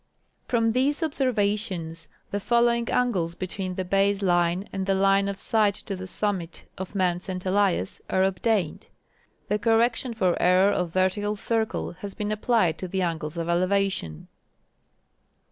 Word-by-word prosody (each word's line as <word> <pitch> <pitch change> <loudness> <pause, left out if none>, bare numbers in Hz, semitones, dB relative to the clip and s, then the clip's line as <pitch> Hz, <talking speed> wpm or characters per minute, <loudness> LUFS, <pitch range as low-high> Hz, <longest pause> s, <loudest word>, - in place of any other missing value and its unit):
From 230 -2 +2
these 275 +7 +1
observations 205 - -1 0.2
the 205 - -1
following 235 +1 +2
angles 185 -10 0
betAveen 185 0 -4
the 185 - -3
base 195 +2 +1
line 175 +1 +1
and 195 -1 -3
the 195 - +2
line 195 +1 +3
of 200 -1 -4
sight 215 -4 +2
to 200 - -5
the 185 0 -7
summit 185 -3 -2
of 190 +2 -7
Mount 180 -2 +1
St. 185 0 -5
Elias 190 - +1
are 190 - +2
obtained. 190 -2 0 0.6
The 210 - 0
correction 230 +2 +1
for 185 -5 +2
error 185 +3 +5
of 180 -3 -1
vertical 190 +4 0
circle 220 +1 -1
has 200 -1 -6
been 210 -1 -3
applied 215 -6 +1
to 185 - -4
the 190 +1 -1
angles 160 -2 -3
of 165 0 -2
elevation. 185 - 0
195 Hz, 150 wpm, -25 LUFS, 180-215 Hz, 0.6 s, error